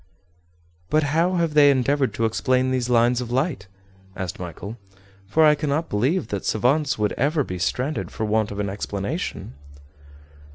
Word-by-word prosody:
"But 155 Hz, +5 st, +3 dB
how 175 Hz, +3 st, +2 dB
have 165 Hz, -3 st, 0 dB
they 145 Hz, -1 st, +7 dB
endeavored 140 Hz, 0 st, +2 dB
to 115 Hz, -, 0 dB
explain 130 Hz, +3 st, +1 dB
these 125 Hz, -1 st, -1 dB
lines 120 Hz, +1 st, +3 dB
of 120 Hz, -, -5 dB
light?" 130 Hz, -, -1 dB, 0.5 s
asked 95 Hz, +2 st, -5 dB
Michel; 90 Hz, +6 st, -7 dB, 0.5 s
"for 160 Hz, +9 st, +4 dB
I 150 Hz, -, +7 dB
cannot 150 Hz, +2 st, -1 dB
believe 135 Hz, -, 0 dB
that 100 Hz, -2 st, -3 dB
savants 140 Hz, +6 st, +1 dB
would 105 Hz, -1 st, 0 dB
ever 145 Hz, +3 st, +2 dB
be 90 Hz, -6 st, -6 dB
stranded 130 Hz, -, -2 dB
for 110 Hz, -, -4 dB
want 110 Hz, 0 st, +1 dB
of 100 Hz, -, -6 dB
an 100 Hz, -, -1 dB
explanation." 100 Hz, -7 st, -4 dB
125 Hz, 160 wpm, -23 LUFS, 105-150 Hz, 0.5 s, they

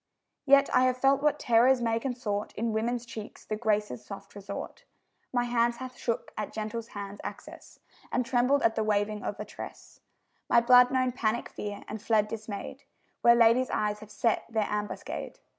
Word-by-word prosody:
Yet 275 Hz, 0 st, +6 dB
I 255 Hz, 0 st, +5 dB
have 255 Hz, 0 st, +1 dB
felt 270 Hz, +2 st, +3 dB
what 300 Hz, 0 st, +2 dB
terrors 250 Hz, 0 st, +4 dB
may 230 Hz, -1 st, 0 dB
consort 230 Hz, -5 st, -3 dB
In 225 Hz, +1 st, -1 dB
women's 235 Hz, +2 st, -1 dB
cheeks, 220 Hz, -2 st, -9 dB
the 215 Hz, -, -2 dB
Graces' 210 Hz, -, -1 dB
soft 195 Hz, +7 st, -10 dB
resort; 205 Hz, -, -7 dB, 0.5 s
My 245 Hz, -1 st, +1 dB
hand 240 Hz, 0 st, +1 dB
hath 255 Hz, +1 st, -8 dB
shook 230 Hz, -2 st, -3 dB
at 215 Hz, -, -4 dB
gentle 215 Hz, +1 st, -4 dB
hands' 205 Hz, -3 st, -8 dB
access, -, -, -9 dB, 0.3 s
And 250 Hz, -, 0 dB
trembled 255 Hz, +3 st, +2 dB
at 225 Hz, -, +4 dB
the 220 Hz, -, 0 dB
waving 210 Hz, 0 st, 0 dB
of -, -, -4 dB
a -, -, -4 dB
tress; -, -, -10 dB, 0.5 s
My 235 Hz, -, +6 dB
blood 250 Hz, +1 st, +7 dB
known 255 Hz, -1 st, +1 dB
panic 235 Hz, -2 st, -1 dB
fear, 205 Hz, -1 st, -6 dB
and 215 Hz, 0 st, -6 dB
fled 215 Hz, -1 st, +2 dB
dismayed, 220 Hz, +4 st, -6 dB, 0.4 s
Where 235 Hz, 0 st, +7 dB
ladies' 235 Hz, +2 st, +4 dB
eyes 210 Hz, 0 st, -1 dB
have 215 Hz, -, -12 dB
set 225 Hz, +2 st, 0 dB
their 220 Hz, -2 st, 0 dB
ambuscade. 210 Hz, 0 st, -4 dB
230 Hz, 175 wpm, -29 LUFS, 210-250 Hz, 0.5 s, blood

